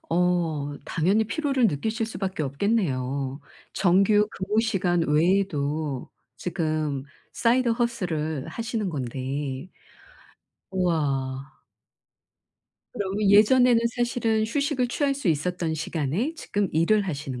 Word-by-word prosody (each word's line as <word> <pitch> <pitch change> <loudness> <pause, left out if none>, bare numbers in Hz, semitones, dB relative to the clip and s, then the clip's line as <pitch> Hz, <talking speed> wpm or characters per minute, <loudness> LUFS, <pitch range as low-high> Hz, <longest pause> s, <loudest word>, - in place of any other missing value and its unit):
어 165 -5 0
당연히 195 +7 +2
피로를 270 +1 +1
느끼실 220 - -1
수밖에 190 -7 -3
없겠네요. 140 - -1 0.3
정규 200 +3 +3
근무 210 +4 0
시간 185 -6 +1
외에도 150 -4 0 0.3
지금 155 -6 -2 0.3
Side 240 +1 +2
Hustle을 160 - -2
하시는 225 -3 -3
건데. 135 +3 -4 1.0
우와. 140 -7 -1 1.4
그러면 200 -1 0
예전에는 235 +4 +6 0.2
사실은 235 -2 +1
휴식을 265 +1 0
취할 275 +2 0
수 270 -8 -2
있었던 165 +1 0
시간에 165 - -2
지금 205 - -1
일을 170 +7 +3
하시는 140 -5 -4
180 Hz, 260 characters per minute, -25 LUFS, 150-220 Hz, 1.4 s, 예전에는